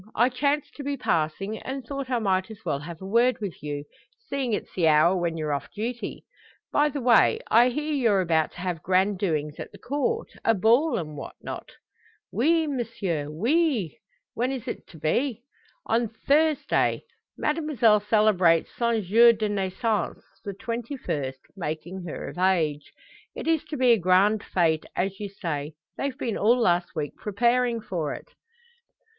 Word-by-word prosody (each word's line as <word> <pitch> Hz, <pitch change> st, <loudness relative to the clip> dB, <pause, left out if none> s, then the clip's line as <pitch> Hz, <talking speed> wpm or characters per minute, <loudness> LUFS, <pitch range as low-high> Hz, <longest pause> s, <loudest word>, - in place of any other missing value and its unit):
I 240 Hz, +3 st, +4 dB
chanced 280 Hz, +3 st, -1 dB
to 285 Hz, -, -6 dB
be 280 Hz, 0 st, -2 dB
passing, 195 Hz, +2 st, -1 dB
and 265 Hz, -1 st, -6 dB
thought 275 Hz, +1 st, -5 dB
I 250 Hz, -, +1 dB
might 190 Hz, -3 st, 0 dB
as 220 Hz, 0 st, -12 dB
well 140 Hz, -, -1 dB
have 165 Hz, +4 st, -9 dB
a -, -, -6 dB
word 235 Hz, +4 st, +3 dB
with 200 Hz, -8 st, -6 dB
you 145 Hz, 0 st, -4 dB, 0.5 s
seeing 275 Hz, -3 st, -1 dB
it's 210 Hz, -, -3 dB
the 170 Hz, -3 st, +2 dB
hour 155 Hz, +4 st, +5 dB
when 170 Hz, -2 st, -1 dB
you're 155 Hz, -2 st, -1 dB
off 140 Hz, -4 st, -4 dB
duty. 235 Hz, +3 st, -5 dB, 0.5 s
By 295 Hz, +1 st, +3 dB
the 285 Hz, -, -4 dB
way, 240 Hz, -2 st, +5 dB
I 240 Hz, +3 st, +6 dB
hear 300 Hz, +4 st, -2 dB
you're 230 Hz, -8 st, +3 dB
about 160 Hz, -3 st, +1 dB
to 175 Hz, -, -9 dB
have 180 Hz, -3 st, -3 dB
grand 190 Hz, +2 st, +2 dB
doings 155 Hz, -6 st, -1 dB
at -, -, -7 dB
the -, -, -13 dB
Court 295 Hz, -, -2 dB
a 225 Hz, -, +3 dB
ball, 235 Hz, -, +3 dB
and 155 Hz, -4 st, -5 dB
what 140 Hz, -, -8 dB
not?" -, -, -7 dB, 0.6 s
"Oui, 320 Hz, -, +3 dB
m'sieu; 225 Hz, -, -3 dB
oui." 235 Hz, -, 0 dB, 0.3 s
"When 245 Hz, +3 st, -1 dB
is 260 Hz, -2 st, -5 dB
it -, -, -6 dB
to 165 Hz, -, -14 dB
be?" 235 Hz, -, -1 dB, 0.4 s
"On 230 Hz, +1 st, +1 dB
Thursday. 295 Hz, +7 st, +1 dB, 0.3 s
Mademoiselle 300 Hz, -9 st, +2 dB
celebrates 205 Hz, -6 st, +3 dB
son 235 Hz, -2 st, +1 dB
jour 230 Hz, +6 st, +6 dB
de 215 Hz, -1 st, -2 dB
naissance 205 Hz, +2 st, -1 dB, 0.2 s
the 200 Hz, -3 st, -5 dB
twenty 240 Hz, +4 st, -4 dB
first, 135 Hz, -, -4 dB
making 175 Hz, +1 st, -5 dB
her 165 Hz, -, -6 dB
of -, -, -8 dB
age. 160 Hz, -6 st, +1 dB, 0.4 s
It -, -, -6 dB
is 325 Hz, -2 st, +2 dB
to 300 Hz, -, -5 dB
be 255 Hz, -1 st, +4 dB
a 230 Hz, -, +5 dB
grand 190 Hz, +4 st, +3 dB
fete 160 Hz, -3 st, +1 dB
as 195 Hz, +1 st, -1 dB
you 205 Hz, -1 st, -4 dB
say. 155 Hz, -6 st, -4 dB, 0.2 s
They've 275 Hz, -2 st, -3 dB
been 230 Hz, -, -2 dB
all 235 Hz, +4 st, +4 dB
last 175 Hz, -5 st, +1 dB
week 150 Hz, -2 st, -3 dB
preparing 235 Hz, +3 st, +1 dB
for 165 Hz, -8 st, -3 dB
it." -, -, -12 dB
210 Hz, 175 wpm, -26 LUFS, 175-250 Hz, 0.6 s, I